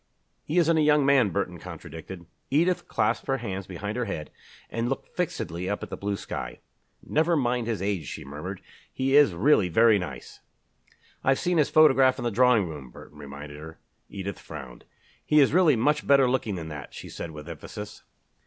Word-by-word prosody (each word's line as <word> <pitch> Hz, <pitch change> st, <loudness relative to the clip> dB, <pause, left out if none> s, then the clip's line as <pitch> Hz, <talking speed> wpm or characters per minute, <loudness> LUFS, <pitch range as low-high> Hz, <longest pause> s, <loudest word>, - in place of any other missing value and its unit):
"He 155 Hz, -, -3 dB
isn't 165 Hz, -2 st, +4 dB
a -, -, +4 dB
young 150 Hz, -1 st, +4 dB
man," 135 Hz, -6 st, +4 dB
Burton 90 Hz, -3 st, -3 dB
contradicted. 85 Hz, +1 st, -9 dB, 0.2 s
Edith 170 Hz, +6 st, +1 dB
clasped 105 Hz, -2 st, 0 dB
her 135 Hz, -1 st, +1 dB
hands 100 Hz, -6 st, -5 dB
behind 100 Hz, +5 st, -5 dB
her 125 Hz, -, -1 dB
head 75 Hz, -7 st, -5 dB, 0.4 s
and 115 Hz, +1 st, -1 dB
looked 135 Hz, -, -5 dB
fixedly 95 Hz, -, -3 dB
up 100 Hz, -, -3 dB
at -, -, -8 dB
the -, -, -3 dB
blue 100 Hz, 0 st, -2 dB
sky. -, -, -6 dB, 0.4 s
"Never 160 Hz, +2 st, +2 dB
mind 120 Hz, -3 st, 0 dB
his 110 Hz, -4 st, -2 dB
age," 95 Hz, -8 st, -2 dB
she -, -, -7 dB
murmured. 75 Hz, +7 st, -7 dB, 0.3 s
"He 135 Hz, +1 st, 0 dB
is 145 Hz, -11 st, +6 dB
really 105 Hz, -, +3 dB
very 110 Hz, +3 st, +5 dB
nice." 85 Hz, -7 st, -8 dB, 0.8 s
"I've 135 Hz, 0 st, +3 dB
seen 175 Hz, -2 st, +1 dB
his 150 Hz, -, +3 dB
photograph 135 Hz, -4 st, +5 dB
in -, -, -5 dB
the 120 Hz, -, 0 dB
drawing 120 Hz, -3 st, +4 dB
room," 75 Hz, -5 st, -8 dB
Burton 75 Hz, +4 st, -14 dB
reminded 70 Hz, +1 st, -9 dB
her. 80 Hz, +1 st, -10 dB, 0.3 s
Edith 100 Hz, -1 st, -6 dB
frowned. 60 Hz, -3 st, -10 dB, 0.4 s
"He 150 Hz, -, +4 dB
is 140 Hz, -1 st, +4 dB
really 170 Hz, -5 st, +5 dB
much 150 Hz, +6 st, +1 dB
better 140 Hz, -2 st, +6 dB
looking 125 Hz, -5 st, 0 dB
than 80 Hz, -3 st, -6 dB
that," 75 Hz, -2 st, -8 dB
she -, -, -8 dB
said 85 Hz, -, -6 dB
with 75 Hz, 0 st, -10 dB
emphasis. 95 Hz, +6 st, -8 dB
105 Hz, 190 wpm, -26 LUFS, 85-135 Hz, 0.8 s, is